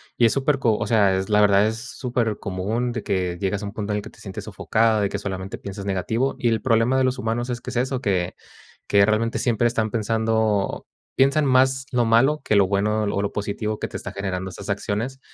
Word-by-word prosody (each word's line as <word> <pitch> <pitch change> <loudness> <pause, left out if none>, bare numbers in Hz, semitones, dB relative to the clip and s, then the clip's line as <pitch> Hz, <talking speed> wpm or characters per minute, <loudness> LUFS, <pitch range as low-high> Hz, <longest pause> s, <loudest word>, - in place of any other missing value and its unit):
y 120 - +4
es 115 - +4
superco, 135 -5 +1
o - - -2
sea, 100 -5 +3
es 95 +2 -3
la 105 0 +4
verdad, 100 0 +5
es 110 +1 -1
supercomún 115 -3 -2
de 115 -2 -4
que 90 -3 -1
llegas 100 +1 -1
a - - -3
un 100 - -6
punto 105 -1 -3
en - - 0
el 105 - -4
que - - -10
te - - -20
sientes - - -7
sofocada, 110 -1 +1
de 100 - +1
que 100 - -3
solamente 95 -1 -5
piensas 100 0 -7
negativo. 110 +7 -1
Y 120 - +1
el 115 -1 0
problema 120 +1 +2
de - - +3
los 130 0 +1
humanos 120 0 -2
es 120 -1 -2
que - - -7
es - - -8
eso, 130 +1 0
que 95 -5 -1 0.5
que 100 -1 +5
realmente 110 +2 +1
siempre 120 -1 +2
están 115 -2 0
pensando 110 -1 0 0.3
piensan 140 +3 +3
más 130 0 +3
lo 120 -2 +2
malo 135 +7 +3
que 110 - +1
lo 100 -2 +5
bueno 105 +2 +1
o 100 -1 -1
lo 100 - -2
positivo 105 +1 -3
que - - -2
te - - -6
está - - -7
generando 95 -1 -4
esas 100 +2 -9
acciones. 110 +6 -2
110 Hz, 230 wpm, -23 LUFS, 100-120 Hz, 0.5 s, verdad